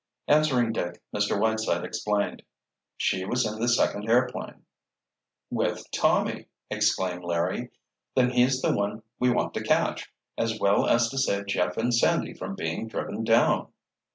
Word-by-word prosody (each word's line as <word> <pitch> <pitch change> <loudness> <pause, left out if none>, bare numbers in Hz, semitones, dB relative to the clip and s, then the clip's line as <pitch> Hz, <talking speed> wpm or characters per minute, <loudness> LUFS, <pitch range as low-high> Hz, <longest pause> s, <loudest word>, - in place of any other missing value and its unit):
Answering 140 -6 +3
Dick, 90 -4 -3 0.2
Mr. 105 -1 +1
Whiteside 110 +1 0
explained. 105 -1 -2 0.6
"She 95 -1 0
was 125 +5 0
in 110 0 -4
the 120 - 0
second 110 -2 +1
airplane." 125 +2 0 0.9
"With - - -1
Tommy!" - - +1 0.2
exclaimed 90 -1 0
Larry. 85 -1 -1 0.5
"Then 125 -1 +3
he's 130 +1 +2
the - - +3
one 105 +2 -2 0.2
we 125 - +3
want 125 - 0
to - - -3
catch, - - 0 0.3
as 110 -1 -1
well 100 0 +3
as 115 0 +4
to 135 - -3
save 100 -6 0
Jeff 90 -3 -1
and 120 +2 +1
Sandy 115 - +2
from - - -6
being 80 +7 -3
driven - - -4
down." - - +3
110 Hz, 150 wpm, -26 LUFS, 100-125 Hz, 0.9 s, as